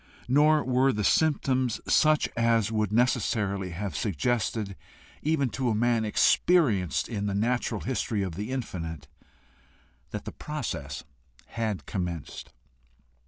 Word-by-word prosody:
Nor 150 +4 +4
were 130 +1 +3
the 105 -3 -2
symptoms 130 -4 +2
such 155 -1 +4
as 115 -2 +2
would 110 -2 0
necessarily 105 -5 +1
have 90 -1 -5
suggested, 100 - -1 0.5
even 150 -4 +1
to 125 +3 -1
a 110 - +1
man 115 0 +2
experienced 110 - +3
in 105 -3 -3
the 100 - -1
natural 115 0 0
history 115 -5 -1
of 95 -3 -4
the 105 +7 -5
infinite, 80 - -5 1.0
that - - -6
the - - -5
process - - -5 0.5
had 110 -8 -3
commenced. 90 -5 -5
110 Hz, 120 wpm, -27 LUFS, 100-130 Hz, 1.0 s, Nor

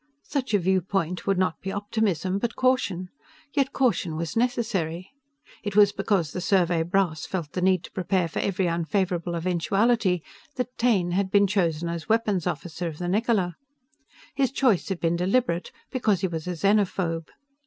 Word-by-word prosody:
Such 260 -7 -1
a - - +6
viewpoint 185 -1 0
would 195 -1 +2
not 185 -2 0
be 190 - -4
optimism, 200 -3 -1
but 235 +2 -2
caution. 225 -9 +1 0.4
Yet 275 -2 +1
caution 225 -10 +1
was 165 +1 -4
necessary. 220 -8 -1 0.5
It 205 -2 -4
was 205 -1 +7
because 195 -6 0
the 180 - -4
Survey 175 -3 +2
brass 170 -3 0
felt 170 -6 -4
the 180 - -3
need 185 -1 +3
to - - -10
prepare 185 -1 0
for 160 - -4
every 190 -2 0
unfavorable 175 0 -1
eventuality 185 +2 +1 0.3
that 250 -1 -3
Taine 205 -8 +2
had 190 +2 0
been 200 +1 +5
chosen 170 -5 0
as 170 +3 -5
weapons 210 -6 +1
officer 170 +2 -3
of 155 -2 -6
the 175 - -4
Niccola. 200 -2 +1 0.8
His 270 -2 +1
choice 250 - +2
had 190 -3 -2
been 170 0 +1
deliberate, 180 -1 0 0.2
because 215 -8 +1
he 190 - +1
was 165 -1 -5
a 180 - -1
xenophobe. 185 -3 +1
185 Hz, 165 wpm, -26 LUFS, 170-210 Hz, 0.8 s, was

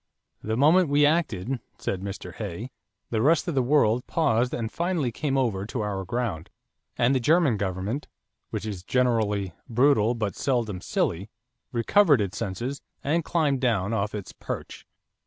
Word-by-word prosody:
"The 110 +1 -2
moment 155 +5 +5
we 145 +1 +4
acted," 135 - 0 0.2
said 95 - -3
Mr. 95 -2 -6
Hay, 105 +4 -6 0.4
"the 110 -2 +1
rest 155 +7 +3
of 170 - -1
the 135 - +2
world 125 -3 +2
paused 125 -7 +2
and 110 -2 -3
finally 170 -7 -1
came 135 +3 -1
over 110 -8 0
to 115 - -3
our 100 -2 -2
ground; 100 -6 -3 0.5
and 120 +3 +3
the 130 - +2
German 150 0 +3
government, 100 +7 -3 0.4
which - - -4
is 100 -4 -4
generally 105 -4 +1 0.2
brutal 120 -2 +3
but 105 -5 -2
seldom 115 -8 -1
silly, 95 +4 -1 0.4
recovered 145 - +4
its 100 -3 -2
senses, 120 +9 -3 0.2
and 160 +4 +1
climbed 150 -6 +1
down 115 -5 +1
off 105 0 -1
its 100 -3 -6
perch." - - -7
120 Hz, 155 wpm, -26 LUFS, 105-140 Hz, 0.5 s, moment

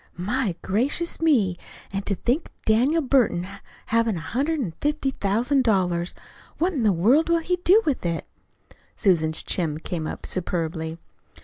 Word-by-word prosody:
"My 205 +1 -1
gracious 270 - 0
me! 220 - +2 0.3
An' 195 - -1
to 200 - +1
think 250 - -1
of - - -30
Daniel 260 +9 +3
Burton 240 -10 +2 0.4
havin' 230 -3 +1
a - - -4
hundred 275 - -1
and 195 -12 -3
fifty 295 -2 0
thousand 245 +6 +1
dollars! 180 -6 +1 0.4
What 360 +4 +1
in 275 - -1
the 215 -2 +4
world 235 - +3
will 335 - +4
he 360 +2 -1
do 380 +5 +4
with 290 -4 0
it?" 170 -2 -2 0.7
Susan's 160 -6 +1
chin 160 -5 -1
came 160 -1 -4
up - - -6
superbly. 165 -2 -2
220 Hz, 155 wpm, -24 LUFS, 175-285 Hz, 0.7 s, the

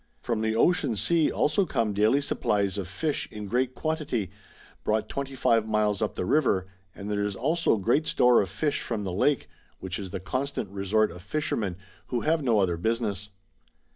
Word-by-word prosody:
From 110 - -1
the 110 0 0
Ocean 175 - +2
Sea 165 +8 +2
also 150 +7 +2
come 115 - 0
daily 110 +7 +3
supplies 100 -7 0
of 95 - -4
fish 145 - -2
in 105 -1 -6
great 125 +5 0
quantity, 150 - -2 0.5
brought 110 0 0
25 130 -5 0
miles 105 -2 +1
up - - -1
the - - -2
river, 95 -7 +2 0.3
and 100 - -7
there 105 -1 0
is 100 -1 -2
also 155 - +1
great 120 +10 +1
store 125 -1 +5
of 95 - -3
fish 145 - -1
from 110 -4 -3
the 95 -2 -3
Lake, 140 +8 +1 0.3
which 95 0 -5
is 95 -2 -5
the 90 - -4
constant 130 +1 -3
resort 100 +2 +1
of 85 +1 -10
fishermen, 105 - -2 0.3
who 120 -2 -1
have 160 +1 +1
no 120 -5 +2
other 90 -4 +2
business. 105 0 -1
110 Hz, 180 wpm, -27 LUFS, 100-140 Hz, 0.5 s, store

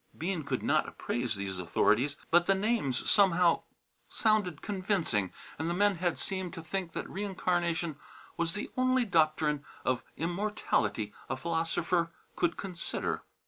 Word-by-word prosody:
Bean 175 +1 -1
could - - -2
not - - +2
appraise 120 -2 -2
these 95 -2 -4
authorities, 115 - +2
but 175 +1 +5
the 195 - +5
names 195 - 0
somehow 180 -4 +5 0.5
sounded 210 -8 +1
convincing 185 - 0 0.3
and 160 +2 -1
the 170 - 0
men 205 0 +3
had 175 0 0
seemed 190 -2 -2
to 165 - -7
think 170 0 -3
that - - -4
reincarnation 175 -5 -1 0.4
was 170 0 -1
the 210 - -5
only 255 -1 +3
doctrine 155 -5 +2 0.2
of 130 -1 +1 0.2
immortality 175 - 0 0.2
a 135 - -1
philosopher 165 +1 0 0.3
could 175 -1 +1
consider. 180 -4 -3
170 Hz, 140 wpm, -31 LUFS, 155-195 Hz, 0.5 s, but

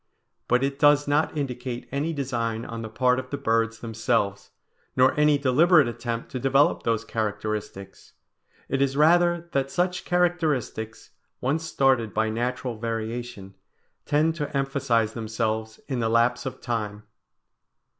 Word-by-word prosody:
But 125 +2 +2
it 140 0 -2
does 145 0 +5
not 150 +2 +1
indicate 125 -3 -4
any 145 +4 -1
design 120 -6 -2
on 115 0 -6
the 110 - -6
part 125 +3 +2
of 130 -1 -7
the 140 - -3
birds 115 -3 0
themselves, 110 -3 -1 0.5
nor 130 +1 +5
any 150 -1 +4
deliberate 145 +3 +4
attempt 120 0 -4
to 130 - -3
develop 135 +3 +3
those 115 -1 -1
characteristics; 105 -3 -4 0.5
it 135 0 -1
is 140 0 +1
rather 170 +2 +4
that 135 0 0
such 180 +2 -1
characteristics, 160 -11 -1 0.3
once 150 +5 -1
started 130 -8 +1
by 110 0 +1
natural 120 0 -3
variation, 115 -2 -4 0.5
tend 155 +2 +2
to 145 -3 -2
emphasize 125 -5 0
themselves 110 0 -3
in 130 -3 -2
the 115 -1 0
lapse 120 +3 +2
of 130 - -7
time. 105 -3 -3
125 Hz, 140 wpm, -25 LUFS, 115-140 Hz, 0.5 s, does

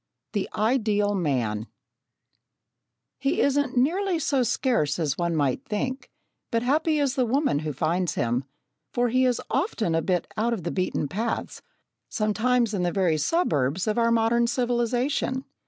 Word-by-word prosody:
The 205 -3 -1
Ideal 210 -3 +1
Man 120 - -1 1.5
He 275 +1 0
isn't 280 -2 +1
nearly 355 +8 +2
so 280 -3 +1
scarce 235 - +1
as 150 -5 0
one 170 0 -1
might 145 - 0
think, 260 +5 -3 0.4
but 230 0 0
happy 305 +4 +2
is 280 -3 +1
the 265 -2 +1
woman 255 - +1
who 155 0 -3
finds 165 +4 -1
him, 120 +2 0 0.5
for 245 -1 +2
he 255 +2 +3
is 250 -1 +1
often 265 - 0
a 165 - +2
bit 180 +2 0
out 230 +2 +1
of 205 -7 -4
the 170 - -2
beaten 185 -5 -1
paths, 225 +10 -3 0.5
sometimes 225 +2 +1
in 195 - -1
the 175 -1 +1
very 175 -5 +1
suburbs 160 - +1
of 215 +2 0
our 230 0 +3
modern 230 +1 +3
civilisation. 245 +2 0
225 Hz, 155 wpm, -25 LUFS, 175-255 Hz, 1.5 s, he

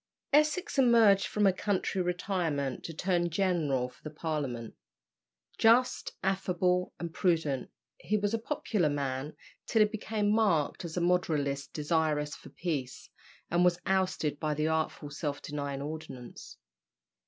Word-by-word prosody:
Essex 305 +3 +3
emerged 230 -6 +5
from 210 -1 +1
a 195 - +5
country 190 0 -1
retirement 175 -7 -1
to - - -4
turn 175 +1 0
general 160 -8 +1
for 125 - -19
the 155 - -6
Parliament. 145 -7 -3 0.9
Just, 245 +3 +4
affable, 180 -1 +1
and 170 -1 -5
prudent, 160 -9 0 0.3
he 215 - 0
was 205 +1 -1
a 230 - +1
popular 220 - 0
man 140 0 -3 0.3
till 225 - +3
he - - +3
became 210 -1 -1
marked 195 -11 +2
as 165 +1 -6
a - - +1
moderatist 150 -6 0
desirous 150 -1 0
for - - -13
peace, 145 -7 -4 0.4
and 175 +1 +3
was 180 -1 +3
ousted 185 -6 0
by 150 -1 -1
the 150 +1 0
artful 160 -2 -1
"Self 145 -1 -3
denying 140 -2 -4
Ordinance." 150 -5 -8
170 Hz, 140 wpm, -30 LUFS, 145-195 Hz, 0.9 s, emerged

